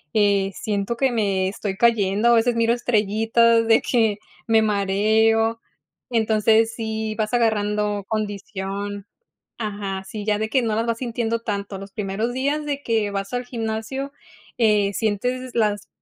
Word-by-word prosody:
eh, 200 -2 +3
siento 205 +3 -2
que 265 +2 +2
me 195 -4 0
estoy 195 0 -4
cayendo, 210 -1 +2
a 235 - +6
veces 235 +1 +2
miro 230 0 +2
estrellitas 230 0 +2
de 225 0 +5
que 220 -4 +1 0.3
me 225 -1 +4
mareo. 220 +2 +2 0.5
Entonces, 220 0 +3
sí 220 -1 -3
vas 215 +1 -2
agarrando 210 -3 0
condición 205 -1 -4 0.5
Ajá. 200 -3 -4
Sí, 205 +2 -7
ya 210 -1 +1
de 220 +1 -2
que 260 +2 +2
no 220 -2 0
las 225 +1 0
vas 230 0 -1
sintiendo 230 -2 -2
tanto. 200 -3 -4
Los 195 0 -10
primeros 210 +3 -2
días 285 +3 -1
de 285 -1 -3
que 220 -4 0
vas 195 +2 -4
al 245 0 -2
gimnasio, 230 +4 -4 0.5
eh, 210 -3 +3
sientes 245 +5 -2
las 205 -3 0
220 Hz, 150 wpm, -22 LUFS, 205-230 Hz, 0.5 s, a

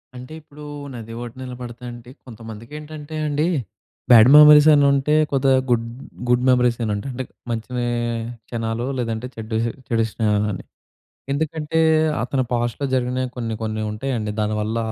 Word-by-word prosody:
అంటే 125 +4 -9
ఇప్పుడు 150 0 -14 0.3
నది 115 -2 -8
ఒడ్డున 120 +2 -9
నిలబడితేంటి 120 -1 -9 0.2
కొంతమందికేంటంటే 145 +7 -9
అండి, 150 +1 0 0.7
బ్యాడ్ 115 0 +9
మెమోరీసని 150 -1 +8
ఉంటయి. 150 +3 +2
కొద్దిగా 135 -1 +3
గుడ్ 115 -1 +2 0.4
గుడ్ 125 0 +3
మెమోరీసని 120 -3 +2
ఉంటయి. 100 +7 -5
అంటే 130 +1 -4 0.3
మంచి 115 +1 -4
వె 120 - 0 0.6
క్షణాలు 115 0 -3
లేదంటే 115 0 -3
చెడ్డు 110 0 -5 0.3
చెడు 115 -1 +1
స్నేహాలని. 105 -3 0 0.7
ఎందుకంటే, 155 +2 -2 0.4
అతను 130 +2 0
పాస్ట్‌లో 120 +3 -1
జరిగినవి 130 0 -1
కొన్ని 115 -2 -3
కొన్ని 110 0 -2
ఉంటయండి 110 -1 -3
దానివల్ల 105 +1 -1
120 Hz, 125 wpm, -21 LUFS, 115-140 Hz, 0.7 s, బ్యాడ్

